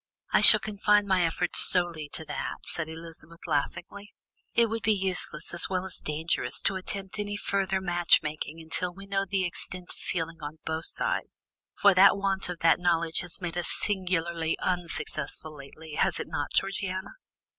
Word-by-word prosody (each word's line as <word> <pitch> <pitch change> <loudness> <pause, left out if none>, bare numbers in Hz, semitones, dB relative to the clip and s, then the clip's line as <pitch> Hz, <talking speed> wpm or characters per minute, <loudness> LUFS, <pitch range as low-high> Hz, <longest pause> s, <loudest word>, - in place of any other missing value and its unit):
"I - - +4
shall - - +11
confine 210 0 +1
my 190 -2 +2
efforts 170 +1 +1
solely 170 -4 +4
to 160 - -1
that," 150 - -6
said 165 -2 0
Elizabeth 165 0 -8
laughingly. 175 +6 -4 0.4
"It 235 -1 +4
would 225 +1 -4
be 215 - +2
useless 185 -5 -3
as - - +1
well 185 -1 -2
as 190 - -7
dangerous 155 +2 -1
to 195 - +2
attempt 190 +1 -3
any 205 0 -3
further 195 -1 -1
matchmaking 165 -4 +1
until 165 +3 -1
we 195 +3 -12
know 195 0 -1
the 195 -1 -1
extent 180 +1 -4
of - - -15
feeling 165 -2 -4
on 150 +1 -7
both 160 +1 -2
sides, - - -1 0.5
for 200 -1 +5
that 195 +2 +6
want 195 -1 -1
of 175 -2 -6
that 165 +1 +4
knowledge 170 -2 +1
has 180 +1 -3
made 175 -2 -4
us 175 - -2
singularly 170 -4 -1
unsuccessful 160 -3 -3
lately, 150 +3 -12
has - - +2
it - - -4
not, 145 - -4
Georgiana?" 195 -1 -1
180 Hz, 170 wpm, -27 LUFS, 165-195 Hz, 0.5 s, shall